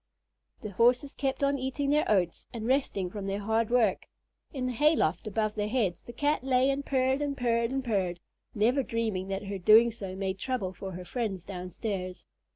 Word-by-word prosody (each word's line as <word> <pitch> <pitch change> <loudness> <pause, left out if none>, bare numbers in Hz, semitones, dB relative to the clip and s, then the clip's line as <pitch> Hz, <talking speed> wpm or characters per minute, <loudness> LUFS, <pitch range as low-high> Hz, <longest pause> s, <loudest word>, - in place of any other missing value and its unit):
The 210 - -5
Horses 245 +7 +3
kept 270 0 -2
on 280 0 +2
eating 270 +2 -1
their 300 +1 +2
oats 180 -5 +1
and 225 -2 -5
resting 230 -8 0
from 200 -1 -5
their 195 +1 -2
hard 220 +2 +1
work. 230 -6 +2 0.4
In 260 -3 -3
the 255 - 0
hay 300 +6 +4
loft 240 - 0
above 215 0 0
their 210 -1 -2
heads, 210 -7 -1
the - - -6
Cat 290 +3 0
lay 260 0 +3
and 275 +1 -2
purred 265 0 +1
and 285 -1 -2
purred 235 -2 +1
and 270 +1 -2
purred, 185 -6 0 0.4
never 240 +6 +3
dreaming 225 -6 -2
that 195 +1 -3
her 195 0 -4
doing 220 +6 +6
so 195 -4 -6
made 190 0 -3
trouble 210 -8 -2
for 190 0 -7
her 180 +1 -7
friends 195 -3 -3
downstairs. 185 0 -5
225 Hz, 195 wpm, -29 LUFS, 195-260 Hz, 0.4 s, doing